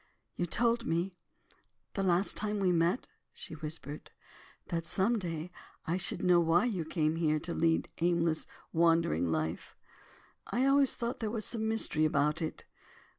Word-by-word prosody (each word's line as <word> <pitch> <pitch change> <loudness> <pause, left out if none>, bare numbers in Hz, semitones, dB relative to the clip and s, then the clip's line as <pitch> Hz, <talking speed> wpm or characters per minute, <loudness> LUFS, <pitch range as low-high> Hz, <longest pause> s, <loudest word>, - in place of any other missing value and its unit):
"You 175 - -1
told 235 +5 +1
me, 170 +3 0 0.8
the 195 - -1
last 185 +1 +2
time 210 0 -1
we 190 -2 +3
met," 170 +7 +1 0.3
she - - -5
whispered, 155 -1 -7 0.6
"that 165 -1 -2
some 220 +4 +2
day 165 -2 -4 0.3
I 170 +3 0
should 185 - -2
know 180 -1 +5
why 170 +4 +3
you 190 -9 -1
came 155 -1 0
here 155 -2 +2
to 170 - -4
lead 165 0 +2
an 170 - +3
aimless, 170 -2 +1 0.3
wandering 165 - +3
life. 80 0 -2 0.7
I 255 +2 +1
always 275 -1 +4
thought 235 +1 -3
there 220 - -2
was 215 -1 -3
some 220 -2 -2
mystery 190 -8 +2
about 150 +1 +1
it. 160 - -4
170 Hz, 160 wpm, -32 LUFS, 160-210 Hz, 0.8 s, know